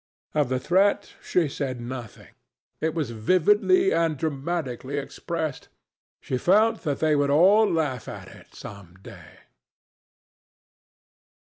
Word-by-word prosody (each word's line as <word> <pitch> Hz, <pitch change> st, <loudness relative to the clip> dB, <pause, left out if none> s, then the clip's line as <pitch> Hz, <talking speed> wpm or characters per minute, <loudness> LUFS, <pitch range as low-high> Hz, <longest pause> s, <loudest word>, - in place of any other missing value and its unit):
Of 150 Hz, -4 st, +1 dB
the 130 Hz, 0 st, 0 dB
threat 190 Hz, +8 st, +1 dB
she 175 Hz, -4 st, +1 dB
said 135 Hz, -3 st, -4 dB
nothing. 120 Hz, -2 st, -9 dB, 0.5 s
It 160 Hz, 0 st, -2 dB
was 150 Hz, -8 st, -2 dB
vividly 205 Hz, -, +3 dB
and 165 Hz, -3 st, +1 dB
dramatically 140 Hz, -2 st, -3 dB
expressed. 155 Hz, +1 st, -4 dB, 0.5 s
She 130 Hz, -, -3 dB
felt 215 Hz, -, +3 dB
that 145 Hz, -5 st, -3 dB
they 155 Hz, -1 st, +3 dB
would 145 Hz, -1 st, +1 dB
all 195 Hz, +9 st, +5 dB
laugh 145 Hz, -7 st, -2 dB
at -, -, -8 dB
it -, -, -16 dB
some 95 Hz, -4 st, -11 dB
day. -, -, -14 dB
155 Hz, 120 wpm, -25 LUFS, 130-175 Hz, 0.5 s, all